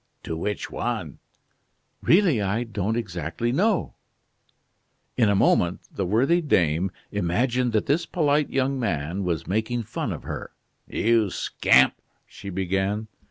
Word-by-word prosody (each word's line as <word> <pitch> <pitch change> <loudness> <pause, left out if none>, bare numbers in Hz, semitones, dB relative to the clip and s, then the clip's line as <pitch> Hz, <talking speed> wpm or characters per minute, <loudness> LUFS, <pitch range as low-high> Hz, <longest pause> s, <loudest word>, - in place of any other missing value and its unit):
"To 80 - -4
which 105 +5 -3
one?" - - -3 0.8
"Really, 170 - +4
I 100 +4 0
don't 110 -1 -2
exactly 95 +1 -3
know." 195 - +1 1.2
In 115 -4 +3
a 100 - +3
moment 90 -2 +2
the 95 - -2
worthy 135 - +3
dame 90 - +2 0.2
imagined 120 +7 0
that 110 - +1
this 150 +5 +1
polite 150 -3 +1
young 135 0 0
man 90 - -2
was 85 -4 -2
making 110 +4 -1
fun - - -4
of - - -6
her. - - -6 0.3
"You 115 -2 +2
scamp 65 -6 +3 0.2
!" - - -45
she 100 - -10
began. 95 +3 -1
110 Hz, 135 wpm, -25 LUFS, 95-125 Hz, 1.2 s, Really